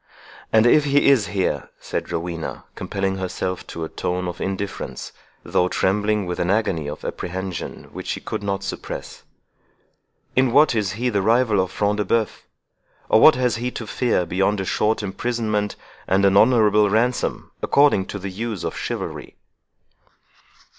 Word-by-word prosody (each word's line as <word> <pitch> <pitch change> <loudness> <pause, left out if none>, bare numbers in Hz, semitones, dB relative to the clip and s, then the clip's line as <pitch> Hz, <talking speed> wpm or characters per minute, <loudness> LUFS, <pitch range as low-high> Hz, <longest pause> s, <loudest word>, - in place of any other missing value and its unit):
"And 110 0 +5
if 150 +5 +5
he 140 0 +4
is 120 -7 +4
here," 95 -2 -1
said - - -4
Rowena, 85 -1 -4
compelling 95 -1 -2
herself 95 0 -3
to 85 - -6
a - - -2
tone 90 +2 -3
of 90 -1 -6
indifference, 95 +1 -4 0.3
though 90 - +1
trembling 105 +2 +1
with 90 0 -4
an 85 - 0
agony 95 -7 0
of 75 - -8
apprehension 95 0 -5
which - - -7
she - - -2
could - - -5
not 100 -1 -2
suppress, - - -6 1.1
"in 130 -1 +3
what 150 +3 +5
is 105 -3 0
he 120 +3 -1
the 100 -4 0
rival 115 0 +3
of 95 -1 +1
Front 105 +2 0
de 105 - 0
Bœuf? 110 +2 0 0.7
or 110 - +5
what 155 - +8
has 125 -3 +1
he 120 +2 -2
to 120 - -6
fear 110 -5 0
beyond 95 +4 +1
a 95 - -2
short 105 +3 0
imprisonment, 105 0 -2 0.3
and 95 +1 +3
an 100 0 +4
honourable 105 -2 +5
ransom, 120 +4 0
according 140 -10 +3
to - - -5
the 100 0 -6
use 110 -1 -4
of - - -3
chivalry?" - - -5
105 Hz, 160 wpm, -22 LUFS, 95-115 Hz, 1.1 s, what